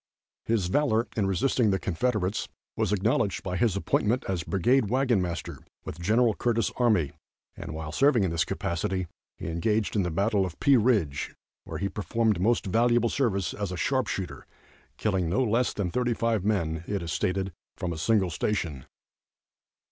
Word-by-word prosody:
His 110 -5 +1
valor 115 +3 +1
in 105 -3 +1
resisting 110 +4 +2
the 95 - +2
Confederates 100 +1 -1 0.3
was - - 0
acknowledged 100 0 +1
by 90 -1 -3
his 110 -1 +2
appointment 110 +4 +1
as 95 -3 -1
Brigade 105 - +2
Wagon 125 -4 +2
Master 85 -2 -4 0.3
with 80 - -7
Gen. 110 +6 +3
Curtis' 115 -3 +1
army, 105 - +2 0.4
and, - - -7
while 80 0 -5
serving 135 - +3
in 95 - 0
this 85 0 +1
capacity, 90 +2 -2 0.3
he - - -7
engaged 105 +7 0
in 105 - +3
the 90 - -1
battle 100 +4 +1
of 90 -3 -5
Pea 140 - +5
Ridge, 105 - +1 0.3
where - - -5
he 100 - -1
performed 105 -1 0
most 115 +4 +2
valuable 120 +4 +3
service 100 -10 0
as 100 -3 -4
a 90 - -4
sharp 130 +7 +1
shooter, 80 -8 -5 0.5
killing 95 -6 0
no 105 +9 +2
less 120 +1 +1
than 95 -4 -2
thirty 125 +2 0
five 115 -3 0
men, 85 -6 0
it 100 -3 -2
is 85 - -4
stated, 95 +3 -1 0.3
from 90 -3 -2
a - - -6
single 95 -1 +2
station. 80 -7 -2
100 Hz, 170 wpm, -27 LUFS, 90-115 Hz, 0.5 s, Pea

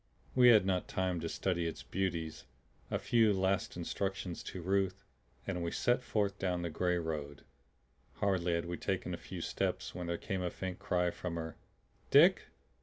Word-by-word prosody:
We 125 -1 +6
had 110 -5 +7
not 95 -2 0
time 95 -2 -1
to 80 0 -3
study 85 -2 0
its 80 - -5
beauties. 85 -5 -2 0.4
A - - 0
few 115 -3 +4
last 95 -1 0
instructions 95 +1 -3
to 95 - -5
Ruth, 95 +1 0 0.4
and 90 -3 -2
we 85 - -1
set 120 +8 +2
forth 100 -4 -1
down 90 -2 0
the 85 - -2
gray 90 +2 +1
road. 75 -4 -4 0.7
Hardly 90 -3 +1
had 85 - -1
we 85 0 -4
taken - - -2
a - - -3
few - - -7
steps - - -2
when 90 -1 -5
there 85 0 -1
came 95 +1 -3
a 90 - 0
faint 90 +1 -5
cry 90 -1 +1
from 85 -1 -5
her. 80 -1 -4 0.5
"Dick! - - +6
90 Hz, 180 wpm, -34 LUFS, 85-95 Hz, 0.7 s, had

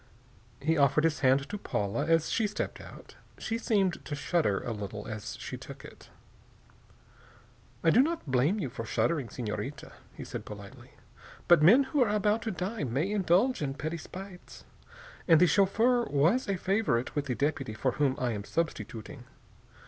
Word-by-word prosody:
He 160 +2 +1
offered 140 +2 +4
his 165 -2 +1
hand 135 +1 +3
to 210 - -5
Paula 105 - -2
as 165 -1 +2
she 220 - +1
stepped 210 - -4
out. - - -13 0.2
She 225 0 -3
seemed 195 -6 0
to 145 - -4
shudder 145 - +1
a 120 - -3
little 105 -1 -6
as 110 -1 -6
she - - -6
took - - -11
it. - - -14 1.7
"I 165 - +5
do 245 - +6
not 325 - -1
blame 135 +8 +2
you 135 -10 -3
for 115 - -5
shuddering, 140 +2 0
Senorita," 130 +5 -5 0.2
he - - -7
said - - -6
politely, - - -11 0.5
"but 175 -3 +6
men 220 - +7
who 270 +1 0
are 225 - -1
about 210 +1 +1
to 225 - -3
die 190 +4 -3
may 140 - -1
indulge 200 +4 +2
in 135 -2 -2
petty 155 +4 -4
spites. 185 +3 -11 0.6
And 165 -3 +7
the 180 - +7
chauffeur 220 - +3
was 170 - +2
a 195 - 0
favorite 185 - 0
with 145 -2 -1
the 125 - -1
deputy 140 -5 -2
for 130 +3 0
whom 135 0 +1
I 125 -2 -1
am 105 -2 -4
substituting. 125 -2 -4
160 Hz, 170 wpm, -29 LUFS, 130-200 Hz, 1.7 s, men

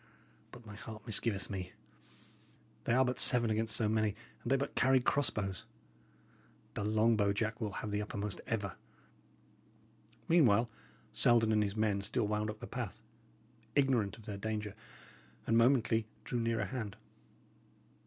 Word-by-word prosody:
But 120 -1 -13
my 105 - -9
heart 110 0 -9
misgiveth 105 -3 -2
me; 95 -2 -5 1.1
they 120 - +2
are 130 +2 +5
but 125 0 -2
seven 120 -3 +5
against 110 +1 +1
so 110 - +2
many, 110 -1 +1 0.3
and 120 - -4
they - - +6
but 140 +1 -2
carry 130 0 +4
cross 130 0 +2
bows. 95 -4 -4 1.1
The - - -3
long 110 +2 +3
bow, 100 -2 +2
Jack, 110 +3 -2
will 105 -3 -2
have 105 - -4
the 105 0 0
uppermost 105 -1 -3
ever." 100 -4 -2 1.5
Meanwhile, 120 -9 +4 0.4
Selden 115 -2 +4
and 105 -1 +3
his 100 -1 -1
men 105 -2 +1
still 105 +3 -1
wound 105 +1 -1
up 105 0 -7
the - - -5
path, - - -5 0.8
ignorant 130 -8 +2
of 110 - -15
their 105 -2 -5
danger, 105 -1 -3 0.7
and 115 - +2
momently 115 -2 +3 0.2
drew 120 - -2
nearer 115 -2 0
hand. 105 -1 -5
110 Hz, 155 wpm, -34 LUFS, 105-120 Hz, 1.5 s, they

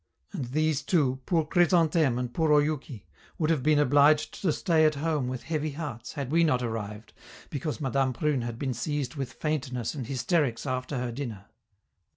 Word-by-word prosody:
And 135 - -3
these 155 +3 0
two, 135 -7 +1
poor 165 -3 +2
Chrysantheme 165 -5 +3
and 125 -1 -3
poor 160 +1 +1
Oyouki, 145 -7 -3 0.3
would 160 -1 +1
have 155 -5 +1
been 150 +2 +3
obliged 145 +1 +3
to 180 - +2
stay 155 +2 +2
at 155 -1 +4
home 150 -3 -1
with 130 -1 -4
heavy 155 -2 -2
hearts, 130 -7 -6
had 140 -3 -4
we 170 +1 +4
not 125 -6 +2
arrived, 110 -2 -5 0.4
because 150 +2 -3
Madame 135 -2 +1
Prune 140 +1 0
had 120 -1 -4
been 130 0 -2
seized 135 +2 -3
with 135 -4 -5
faintness 130 -5 -2
and 135 -7 -5
hysterics 135 -1 0
after 130 +1 -2
her 125 -1 -2
dinner." 115 -6 -6
140 Hz, 180 wpm, -28 LUFS, 125-155 Hz, 0.4 s, at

